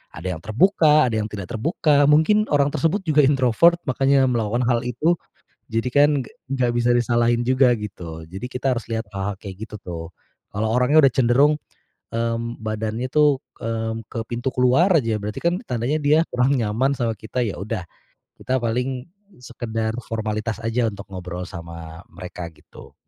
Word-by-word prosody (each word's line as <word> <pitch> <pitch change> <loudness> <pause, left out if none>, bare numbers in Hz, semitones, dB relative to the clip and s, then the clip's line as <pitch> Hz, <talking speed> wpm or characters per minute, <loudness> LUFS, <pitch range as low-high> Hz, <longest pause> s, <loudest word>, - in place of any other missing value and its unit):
Ada 90 +4 -4
yang 80 - -15
terbuka, 155 - +4
ada - - -1
yang 105 - -2
tidak 100 -4 -7
terbuka, 145 +3 +2
mungkin 210 +9 +4
orang 145 -1 +2
tersebut 190 +5 0
juga 155 -2 +2
introvert, 135 +4 +4
makanya 135 +1 +3
melakukan 120 0 0
hal 120 0 +2
itu. 150 +8 +1 0.6
Jadi 115 +2 0
kan 145 +2 +5
g - - -13 0.3
gak 125 -3 +1
bisa 120 0 +2
disalahin 120 0 +2
juga 130 -1 +4
gitu. 85 -6 -7
Jadi 95 +8 -7
kita 130 0 0
harus 120 - -5
lihat 110 -2 -2
hal-hal 100 +1 -2
kayak 100 +1 -8
gitu - - -9
tuh. 85 -2 -6 0.5
Kalau 105 +2 -1
orangnya 125 +6 +4
udah 135 - +6
cenderung, 135 +4 +4 0.6
mmm, 115 +1 -2
badannya 110 +2 -3
tuh, 150 -2 +4 0.2
mmm, 115 -1 -3
ke - - -7
pintu 120 +2 -2
keluar 130 +9 +4
aja 115 -5 0
berarti 105 +1 -5
kan 175 +2 +1
tandanya 125 +5 -1
dia 150 +2 +4
kurang 130 +2 +2
nyaman 120 +4 +1
sama 115 -2 0
kita 120 +4 -2
ya 105 - -3
udah 105 -3 -4 0.6
kita 130 - 0
paling 125 +2 -2 0.4
sekedar 115 -2 -3
formalitas 110 0 -3
aja 115 0 +1
untuk 100 -1 -9
ngobrol 90 -1 -5
sama 85 -2 -9
mereka 90 -2 -7
gitu. - - -16
120 Hz, 165 wpm, -22 LUFS, 110-135 Hz, 0.6 s, udah